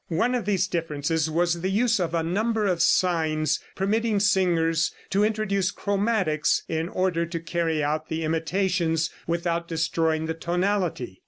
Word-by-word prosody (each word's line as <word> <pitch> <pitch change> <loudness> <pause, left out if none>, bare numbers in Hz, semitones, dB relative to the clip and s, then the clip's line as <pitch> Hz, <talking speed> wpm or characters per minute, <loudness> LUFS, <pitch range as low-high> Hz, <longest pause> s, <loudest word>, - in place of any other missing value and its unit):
One 205 +9 +1
of 245 -3 -1
these 195 -2 +1
differences 160 -3 -1
was 170 +1 0
the 190 - -1
use 225 +2 +2
of 170 -2 -1
a 165 - +1
number 215 +6 0
of 180 -4 +1
signs 155 -4 +2 0.2
permitting 215 +2 +1
singers 170 -5 +2 0.2
to 200 +1 +3
introduce 210 -3 0
chromatics 200 -8 0
in 160 +1 -2
order 185 -3 0
to 170 0 -4
carry 165 -2 -1
out 155 +2 -2
the 160 0 -2
imitations 165 0 0 0.2
without 170 0 -1
destroying 160 -1 0
the 160 - -2
tonality. 175 - -1
170 Hz, 150 wpm, -25 LUFS, 160-195 Hz, 0.2 s, to